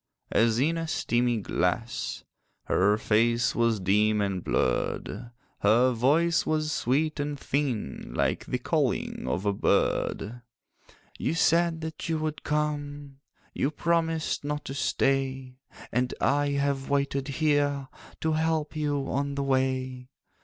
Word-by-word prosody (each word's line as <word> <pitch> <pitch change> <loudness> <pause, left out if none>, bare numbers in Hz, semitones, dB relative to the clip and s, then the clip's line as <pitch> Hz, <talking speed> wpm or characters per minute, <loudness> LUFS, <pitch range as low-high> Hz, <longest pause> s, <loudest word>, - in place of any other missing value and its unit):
As 115 -1 +3
in 160 +6 +1
a 165 - -3
steamy 120 -5 +1
glass, 110 +4 -2 0.4
Her 105 +3 +3
face 115 +2 +2
was 115 -2 +2
dim 105 +3 +2
and 100 -3 -1
blurred; 105 - -1 0.3
Her 120 +5 +4
voice 150 +8 +3
was 155 0 0
sweet 150 +4 0
and 145 0 -2
thin, 130 - -2
Like - - 0
the - - -1
calling - - -1
of 85 +10 -2
a 100 - +2
bird. 115 +3 0 0.8
'You 165 - 0
said 165 0 +3
that 160 0 -5
you 160 - +1
would 155 -1 -3
come, 145 -2 -2 0.3
You 135 - 0
promised 165 0 0
not 150 +1 -3
to 135 - -5
stay; 135 -2 0 0.3
And 125 +1 0
I 145 +1 +2
have 140 -1 -1
waited 140 -1 0
here, 145 -1 +1 0.3
To 160 - +1
help 160 0 0
you 145 -2 -1
on 140 +1 -1
the 140 - -1
way. 130 -1 -1
135 Hz, 130 wpm, -27 LUFS, 120-150 Hz, 0.8 s, Her